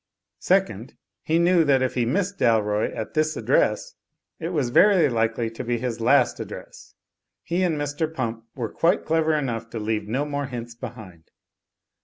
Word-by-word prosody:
Second, 150 - 0 0.3
he 160 - +1
knew 170 0 +4
that 135 -3 +3
if 130 - -1
he 120 -2 0
missed 195 +8 -1
Dalroy 105 -2 +2
at 110 - -5
this 155 0 0
address, - - +1 0.5
it 165 - -3
was 145 -9 -1
very 190 +4 +5
likely 115 0 0
to 115 - -6
be 120 0 -1
his 115 -1 -4
last 125 +1 +3
address; - - -9 0.5
he 175 +2 -1
and 170 -4 +1
Mr. 145 +2 -2
Pump 115 -6 -4
were 115 -5 -4
quite 170 +3 +2
clever 160 -1 +2
enough 115 -6 -3
to 115 - -6
leave 105 0 -2
no 130 +7 -1
more 145 -1 -3
hints 120 -2 -7
behind. 95 -7 -10
130 Hz, 170 wpm, -24 LUFS, 115-160 Hz, 0.5 s, very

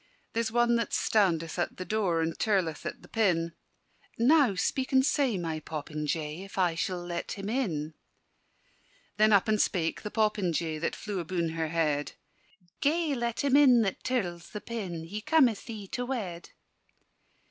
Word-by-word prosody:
"There's 230 -1 0
one 240 0 +3
that 230 - -2
standeth 175 -6 +1
at 175 - -2
the 185 - -5
door, 190 -6 +1
And 165 0 -1
tirleth 185 -7 0
at - - -7
the - - -13
pin: 175 -7 +1 0.7
Now 260 -3 +4
speak 260 +7 -1
and 265 0 +5
say, 275 -8 +2
my 165 -3 -3
popinjay, 150 +2 -4
If 195 - -11
I 180 -3 +3
sall 175 +1 -3
let 175 -1 -4
him 195 0 -6
in." 165 - -1 1.2
Then 215 +1 +5
up 200 +2 +5
and 215 -1 +3
spake 165 -4 0
the 210 - -5
popinjay 180 -8 0
That 170 - -2
flew 205 -3 -4
abune 170 0 -1
her 160 0 -2
head: 155 -3 0 0.7
"Gae 315 +1 +1
let 235 -1 -2
him 280 -1 +3
in 255 -5 +7
that 195 -3 -3
tirls 180 -10 -2
the 210 - -3
pin: 195 -7 -5
He 200 +6 -6
cometh 260 -6 +3
thee 215 -4 -7
to 245 0 -3
wed." 190 -10 -4
195 Hz, 165 wpm, -29 LUFS, 165-235 Hz, 1.2 s, in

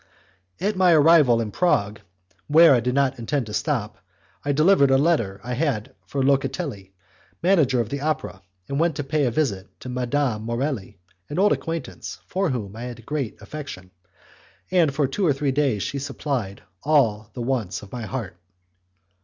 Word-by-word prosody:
At 205 +2 0
my 185 -2 +5
arrival 150 -6 +6
in 110 -2 -3
Prague, 105 - +1 0.5
where 160 +1 +7
I 125 - +4
did 125 +2 -1
not 135 -2 +1
intend 130 +3 -1
to 105 - -8
stop, 115 -4 -2 0.4
I 145 - 0
delivered 155 0 +4
a 135 - +5
letter 135 - +1
I 125 +1 -4
had 125 -6 -1
for 135 +4 -1
Locatelli, 135 - -1 0.5
manager 155 -9 +3
of 115 -2 -1
the 140 +2 -4
opera, 150 -10 -2 0.3
and 140 +1 -2
went 165 -2 +2
to 145 - -3
pay 145 +1 0
a - - +2
visit 115 -7 -2
to 130 - -7
Madame 125 -2 -1
Morelli, 115 -2 -3 0.3
an 150 - -5
old 205 +2 +4
acquaintance, 165 0 -5
for 190 -1 -1
whom 110 -6 -4
I 115 - -8
had 120 -2 -8
great 140 -5 -3
affection, 140 -12 -8 0.8
and 170 -5 +4
for 140 +1 +1
two 165 +10 -3
or 155 -6 +4
three 135 0 -1
days 130 -7 +1
she 140 - -3
supplied 135 -7 -4 0.2
all 115 -9 +2
the 120 - -4
wants 115 -8 -2
of 100 - -13
my 120 -3 -5
heart. 110 -9 -5
135 Hz, 175 wpm, -23 LUFS, 115-150 Hz, 0.8 s, where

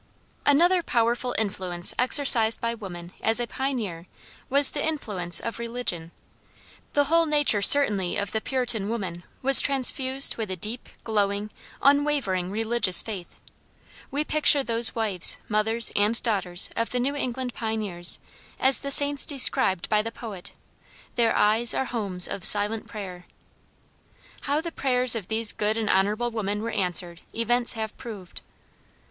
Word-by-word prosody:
Another 345 +6 +3
powerful 240 -2 -2
influence 185 -5 0
exercised 245 -3 +5
by 230 0 -3
woman 180 -6 -11
as 225 +2 +1
a 240 - -2
pioneer 225 -11 -5 0.4
was 280 +1 +4
the 290 - -5
influence 205 - -2
of 230 0 -7
religion. 230 -9 -4 0.8
The 290 - +2
whole 330 +3 +1
nature 295 -9 +1
certainly 200 -7 +5
of 200 0 -5
the 220 - -3
Puritan 240 -6 -1
woman 190 -7 -6 0.2
was 270 0 +8
transfused 265 0 +1
with 220 -3 -5
a 185 - -5
deep, 215 +7 -2
glowing, 205 -1 -3 0.3
unwavering 280 -11 0
religious 220 -2 +3
faith. 195 -6 -9 0.7
We 285 +2 -3
picture 300 -2 +2
those 230 -1 -1
wives, 210 -6 -1
mothers, 220 +2 +1
and 210 +3 +1
daughters 190 -6 +2
of 230 - -3
the 250 - -4
New 275 +4 -3
England 255 -2 -5
pioneers 210 -6 0 0.4
as 265 0 +3
the 280 - -6
saints 285 0 +5
described 260 - 0
by 210 -1 0
the 225 +1 -7
poet, 210 -7 -10 0.6
"Their 235 -2 0
eyes 220 +3 +2
are 265 - -2
homes 200 -8 +1
of 195 - -7
silent 210 +3 +3
prayer." 185 -5 -10 1.2
How 290 +2 -1
the 335 0 -7
prayers 255 -4 +3
of 220 -6 -4
these 220 -1 +1
good 215 +1 -3
and 220 -2 -2
honorable 210 +5 -1
women 210 -1 -4
were 230 - -5
answered 180 -3 -4
events 240 +1 0
have 220 -2 -7
proved. 205 -7 -11
225 Hz, 145 wpm, -23 LUFS, 200-255 Hz, 1.2 s, was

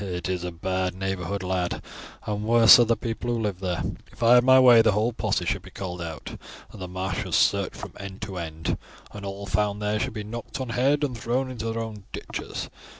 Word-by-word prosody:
"It 90 -2 -4
is 90 -1 -2
a 90 - -3
bad 95 +2 -2
neighbourhood, 95 0 -3
lad, 90 -1 -1 0.5
and 105 0 -2
worse 115 +1 +8
are 120 - +6
the 115 0 +2
people 115 +1 -4
who 120 - 0
live 105 -5 -2
there. 90 -3 -2 0.3
If - - -7
I 115 +1 +7
had 125 0 +7
my 130 +1 +7
way 125 -3 +8
the 110 - +3
whole 110 +4 +1
posse - - -1
should - - -1
be - - -12
called 90 -2 -6
out, 80 -2 -7 0.3
and 105 - -11
the 90 - -4
marshes 95 0 -3
searched - - +2
from - - -8
end 100 -1 -8
to 100 -3 -6
end, 80 -1 -3 0.3
and 105 - -9
all 100 0 -5
found 105 +1 0
there 105 0 0
should 130 +2 -2
be 105 -2 -5
knocked 115 +5 -6
on 130 -2 -4
head 135 +5 +2
and 135 -4 -1
thrown 125 +4 -1
into 115 -2 -3
their 115 0 -2
own 105 -3 -8
ditches. - - -5
105 Hz, 225 wpm, -25 LUFS, 95-115 Hz, 0.5 s, worse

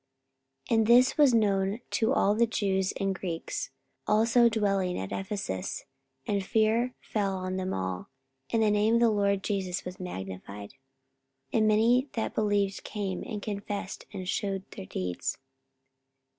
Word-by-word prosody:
44:019:017 - - +5
And 220 - +2
this 245 +2 +6
was 290 -5 +5
known 200 -1 +2
to 225 +2 +2
all 205 -7 +3
the 230 +2 +3
Jews 190 -4 0
and 195 0 +1
Greeks 175 -3 -4 0.4
also 230 +3 +5
dwelling 195 -4 0
at 95 0 -5
Ephesus; 190 - -3 0.4
and 200 -2 0
fear 225 +4 +2
fell 200 -3 -1
on 185 0 -3
them 185 0 -2
all, 95 -1 -3 0.4
and 225 -1 +2
the 215 - +4
name 210 +2 +3
of 235 - +3
the 235 -1 +5
Lord 200 -2 +1
Jesus 190 -3 -2
was 180 +1 -7
magnified. 100 - -7
44:019:018 135 - -28 0.8
And 215 - +4
many 235 +5 +4
that 225 - -2
believed 205 -2 0
came, 195 -3 -3
and 210 -3 -5
confessed, 205 -2 -5
and 190 -3 -6
shewed 195 0 -1
their 95 - -8
deeds. 90 -2 -3
200 Hz, 155 wpm, -29 LUFS, 185-220 Hz, 0.8 s, this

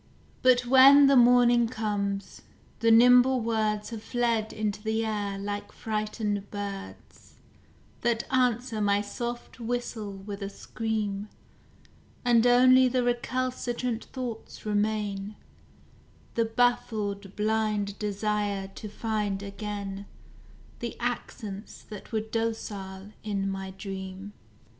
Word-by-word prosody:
But 250 -1 +4
when 270 +3 +8
the 275 0 +5
morning 240 -1 +6
comes, 205 -4 -3 0.4
the 230 - +3
nimble 250 +3 +7
words 220 -2 -1
Have 225 -2 -6
fled 230 -2 0
into 210 -1 -3
the 220 +1 -1
air 205 -2 -2
like 205 +1 -5
frightened 210 -2 -3
birds, 200 -1 -8 0.7
That 235 -1 +1
answer 245 -3 +1
my 205 0 +3
soft 240 +4 -6
whistle 230 -3 -3
with 200 +1 -8
a 200 - -3
scream; 210 -1 -3 1.0
And 240 -1 +5
only 255 +1 +6
the 250 0 +1
recalcitrant 245 -1 -2
thoughts 245 -5 -7
remain; 210 -1 -1 1.0
The 230 - +1
baffled 215 -4 0
blind 210 -1 0
desire 205 -1 -1
to 210 +2 -9
find 210 -2 -2
again 200 -1 -5 0.7
The - - -5
accents 205 -3 -5
that 210 -2 -10
were 220 -1 0
docile 210 -3 -4
in 200 -2 -2
my 195 0 -4
dream. 195 0 -7
215 Hz, 110 wpm, -28 LUFS, 200-240 Hz, 1.0 s, when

